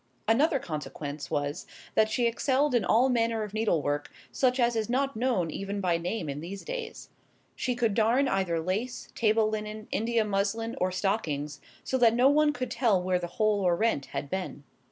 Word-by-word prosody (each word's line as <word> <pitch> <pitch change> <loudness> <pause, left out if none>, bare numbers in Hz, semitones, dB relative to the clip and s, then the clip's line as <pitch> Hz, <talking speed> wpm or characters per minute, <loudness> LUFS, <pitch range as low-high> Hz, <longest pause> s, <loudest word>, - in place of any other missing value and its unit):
Another 275 +7 +3
consequence 150 - -6
was, 145 0 -2 0.3
that 220 0 +3
she 240 +2 +1
excelled 265 +4 +1
in 240 - +3
all 240 +4 +4
manner 230 -3 +1
of 210 -1 -7
needlework, 155 -10 0 0.2
such 255 0 +1
as 240 -1 +3
is 220 -1 -1
not 270 +2 0
known 220 -9 0
even 195 +3 -4
by 175 -3 +1
name 175 +1 -3
in 140 +1 -4
these 195 +4 -7
days. 480 -2 -6 0.5
She 250 -1 -1
could 235 -3 +1
darn 235 +6 +3
either 190 -7 0
lace, 200 +9 -3
table 220 -1 +2
linen, 215 0 -4
India 225 0 +1
muslin, 210 +3 -1
or 185 0 +2
stockings, 155 -7 -2 0.2
so 260 - -1
that 230 -2 +5
no 250 +3 +5
one 300 +1 +4
could 255 -4 -4
tell 230 -6 +2
where 180 0 0
the 175 - -4
hole 215 -2 +2
or 180 -2 +3
rent 215 -8 0
had - - -4
been. 180 -3 -4
215 Hz, 185 wpm, -28 LUFS, 180-240 Hz, 0.5 s, that